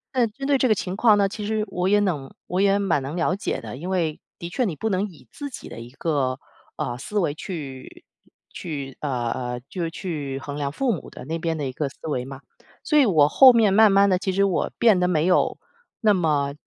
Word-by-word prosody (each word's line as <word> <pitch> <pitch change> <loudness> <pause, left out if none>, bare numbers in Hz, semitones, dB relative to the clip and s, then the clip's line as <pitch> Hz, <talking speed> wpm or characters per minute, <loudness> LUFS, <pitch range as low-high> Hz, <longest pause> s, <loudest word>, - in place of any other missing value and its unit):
那 245 -2 +3
针 245 +6 -8
对 280 -2 +3
这 255 - +3
个 215 - +4
情 185 -1 -4
况 215 0 +5
呢， 200 -1 +3
其 210 +1 -6
实 215 0 0
我 180 +1 -1
也 205 +1 +4
能， 160 -10 -1
我 180 +1 -1
也 200 0 +4
蛮 195 -8 +1
能 135 +4 -5
了 175 0 +1
解 200 - -3
的。 115 +1 -8
因 170 +6 -6
为 165 -5 -1 0.2
的 170 - -6
确 175 +9 -1
你 180 -7 -2
不 220 - -3
能 190 +2 0
以 175 -7 -16
自 285 -1 -6
己 260 - -9
的 - - -9
一 115 +1 -9
个， 135 -2 -1 0.4
呃， 120 - -3
思 210 - -5
维 170 -7 +1
去 145 -6 -8 0.5
去， 140 -6 -6
呃 125 -5 -1
呃， 125 0 -3
就 185 - -5
是 165 - -1
去 155 -6 -5
衡 140 +1 -6
量 140 -1 -2
父 255 - 0
母 170 - -7
的 - - -10
那 165 +4 -3
边 165 -1 -2
的 145 - -3
一 130 - -3
个 140 +2 -3
思 140 - -15
维 125 -5 -2
嘛。 135 0 -9 0.4
所 300 - +3
以 270 - +5
我 155 -7 +5
后 260 - +8
面 220 -4 +4
慢 215 0 +6
慢 200 +1 +5
地 185 -2 +2
其 190 +1 -1
实 195 +2 +2
我 195 -3 0
变 220 -6 +4
得 180 - +2
没 160 -3 +1
有 180 - +2 0.4
那 215 -3 +5
么 150 -6 +1
175 Hz, 265 characters per minute, -23 LUFS, 140-205 Hz, 0.5 s, 后